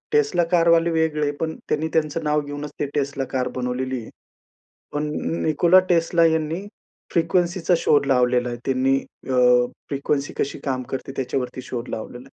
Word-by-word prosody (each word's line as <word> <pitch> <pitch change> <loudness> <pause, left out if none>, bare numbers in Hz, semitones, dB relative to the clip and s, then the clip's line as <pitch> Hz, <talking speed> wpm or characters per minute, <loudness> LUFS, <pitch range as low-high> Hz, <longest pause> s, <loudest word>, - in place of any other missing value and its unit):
Tesla 430 - +3
कारवाले 170 -1 +4
वेगळे. 155 -2 +1
पण 160 -1 -2
त्यांनी 155 +1 0
त्यांचं 160 0 0
नाव 150 0 +1
घेऊनच 145 0 -6
ते 145 - +1
Tesla 140 -1 -1
कार 130 -2 0
बनवलेली 125 0 -2
आहे. - - -11 0.8
पण 150 0 -1 0.4
Nikola 170 +4 +5
Tesla 170 0 +3
यांनी 160 +3 -1 0.5
फ्रिक्वेन्सीचा 175 +1 +1
शोध 145 -3 +3
लावलेला 125 -1 +2
आहे. 120 - -4
त्यांनी 135 0 +2 0.3
अ, 130 - +1 0.5
फ्रिक्वेन्सी 140 0 -1
कशी 140 - -2
काम 130 -2 -1
करते 135 0 -4
त्याच्यावरती 130 -1 -3
शोध 120 -1 -6
लावलेला 120 +3 -6
आहे. - - -27
145 Hz, 150 wpm, -23 LUFS, 130-165 Hz, 0.8 s, Nikola